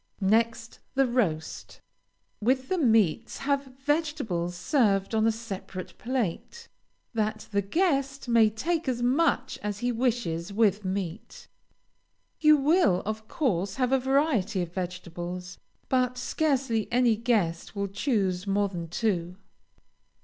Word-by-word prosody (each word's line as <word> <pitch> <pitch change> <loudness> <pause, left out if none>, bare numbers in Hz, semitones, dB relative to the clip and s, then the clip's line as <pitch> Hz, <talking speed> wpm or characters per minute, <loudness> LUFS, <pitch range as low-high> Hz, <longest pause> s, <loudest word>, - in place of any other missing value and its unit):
Next 230 +3 +1 0.2
the 270 0 +4
roast. 205 -11 -2 0.6
With 260 +4 +1
the 375 - +1
meats 220 - +2
have 280 0 0 0.2
vegetables 290 - -1
served 200 - +1
on 220 0 +3
a - - +4
separate 195 -4 -7
plate, 255 - -3 0.5
that 215 -1 -2
the 200 -1 +2
guest 275 - 0
may 230 -2 +5
take 320 +10 -2
as 240 -2 -1
much 260 0 +1
as 205 -1 -3
he 245 +3 -1
wishes 225 -8 -1
with 205 -1 +2
meat. 190 0 -5 0.9
You 305 -1 +6
will, 285 - +3
of 215 +1 -4
course, 195 - -1
have 255 -1 0
a 270 - +4
variety 260 - +1
of 170 0 -8
vegetables, 180 0 -5 0.3
but 250 -1 +1
scarcely 255 -6 0
any 240 -2 +4
guest 210 -7 0
will 200 0 -1
choose 195 -3 -1
more 200 +1 +1
than 170 -3 -5
two. 175 -1 -1
225 Hz, 125 wpm, -27 LUFS, 190-260 Hz, 0.9 s, You